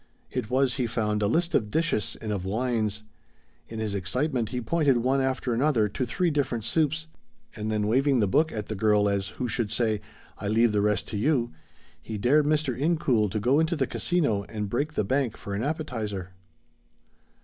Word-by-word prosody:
It 105 - -3
was, 130 -1 +2
he 125 -3 0
found, 105 -2 -1
a 100 - +2
list 170 +10 +1
of 105 - +2
dishes 160 - 0
and 110 - -4
of 100 -3 -2
wines. 110 0 -1 0.7
In 115 - -7
his 110 -2 -2
excitement, 115 - -1
he 125 - -3
pointed 140 +1 +2
one 130 +3 +2
after 130 -2 -1
another 120 -3 +2
to 125 +6 -2
three 175 +7 0
different 130 -6 -1
soups, 160 +5 +1 0.5
and 110 0 -3
then 105 -1 0
waving 130 +4 +3
the 105 - +3
book 155 +10 +2
at 105 -2 -4
the - - -4
girl 105 0 +3
as 100 -1 0
who 125 - -1
should 115 -2 -1
say, 110 -3 +1 0.4
"I 105 - -4
leave 115 +2 +3
the 105 -1 +1
rest 105 0 +1
to 105 - -3
you," 120 +1 +1 0.5
he 110 - -5
dared 145 +8 +3
Mr. 150 -4 +1
Incoul 135 -7 +1
to 105 - -2
go 125 +7 +3
into 160 +2 +1
the 140 -4 +1
Casino 145 - 0
and 105 -2 -4
break 145 +6 -1
the - - 0
bank 130 +1 0
for 100 - -6
an 100 - -2
appetizer. 110 - -3
120 Hz, 195 wpm, -27 LUFS, 105-140 Hz, 0.7 s, waving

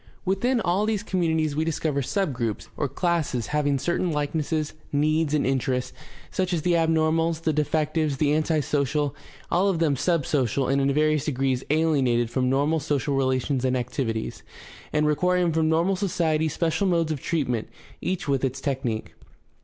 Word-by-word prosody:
Within 235 +7 +1
all 190 +1 +1
these 215 -2 0
communities 160 -6 0
we 155 - +1
discover 155 -3 -1
subgroups 125 - -2
or 145 - -1
classes 160 - -1
having 145 -2 +2
certain 175 +4 0
likenesses, 150 +1 -1 0.2
needs, 155 +1 +1
and 150 - +1
interests, 130 -1 -1 0.4
such 185 -1 -1
as 160 -3 -1
the 180 - +2
abnormals, 165 0 +2
the 160 - +1
defectives, 155 0 0
the 145 0 +2
anti 155 0 +1
social 145 0 0 0.2
— - - -23
all 185 +3 +3
of 190 -4 +1
them 160 -4 +2
sub 165 +1 +1
social, 135 -2 0
and 140 +1 +2
in 135 0 +2
various 155 0 +2
degrees 135 -2 0
"alienated" 135 -7 +2
from 130 -1 +1
normal 145 +4 +2
social 145 -1 -1
relations 130 0 0
and 130 0 +1
activities, 120 -2 -3 0.5
and 150 0 +2
requiring 180 +3 +2
from 160 0 +2
normal 170 +4 +2
society 165 -5 0
special 165 +4 0
modes 170 -3 +1
of 145 -4 -3
treatment, 130 -9 -1 0.3
each 185 -3 -2
with 140 -2 +1
its 130 -1 -1
technique. 130 -6 -3
155 Hz, 165 wpm, -25 LUFS, 135-165 Hz, 0.5 s, all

